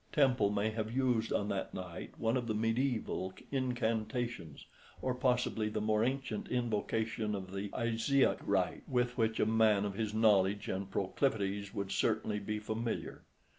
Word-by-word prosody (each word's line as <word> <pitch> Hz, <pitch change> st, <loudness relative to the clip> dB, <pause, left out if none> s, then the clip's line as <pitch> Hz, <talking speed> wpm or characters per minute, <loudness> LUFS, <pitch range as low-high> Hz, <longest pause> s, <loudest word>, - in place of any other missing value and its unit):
Temple 130 Hz, -8 st, +4 dB
may 105 Hz, +1 st, 0 dB
have 110 Hz, 0 st, -3 dB
used 125 Hz, -3 st, +1 dB
on 105 Hz, -, 0 dB
that 100 Hz, -2 st, -3 dB
night 90 Hz, -2 st, -7 dB
one 115 Hz, +2 st, +1 dB
of 125 Hz, -2 st, -1 dB
the 110 Hz, -, 0 dB
medieval 115 Hz, -4 st, 0 dB, 0.2 s
incantations, 120 Hz, -, -2 dB, 0.3 s
or 130 Hz, -, -1 dB
possibly 125 Hz, -4 st, +1 dB
the 105 Hz, -, -2 dB
more 105 Hz, 0 st, +2 dB
ancient 130 Hz, -3 st, -2 dB
invocation 110 Hz, -2 st, -1 dB
of 95 Hz, -1 st, -6 dB
the 100 Hz, +1 st, -3 dB
Isiac 115 Hz, +4 st, +2 dB
rite -, -, 0 dB
with 125 Hz, -1 st, +1 dB
which 110 Hz, -1 st, +1 dB
a -, -, +4 dB
man 110 Hz, -2 st, +4 dB
of 100 Hz, -, -2 dB
his 110 Hz, +1 st, -2 dB
knowledge 105 Hz, -2 st, +3 dB
and 95 Hz, +1 st, -3 dB
proclivities 100 Hz, -1 st, -1 dB
would 100 Hz, -1 st, -3 dB
certainly 105 Hz, -1 st, +1 dB
be 105 Hz, +1 st, -3 dB
familiar. 110 Hz, +2 st, -4 dB
110 Hz, 155 wpm, -34 LUFS, 105-120 Hz, 0.3 s, Temple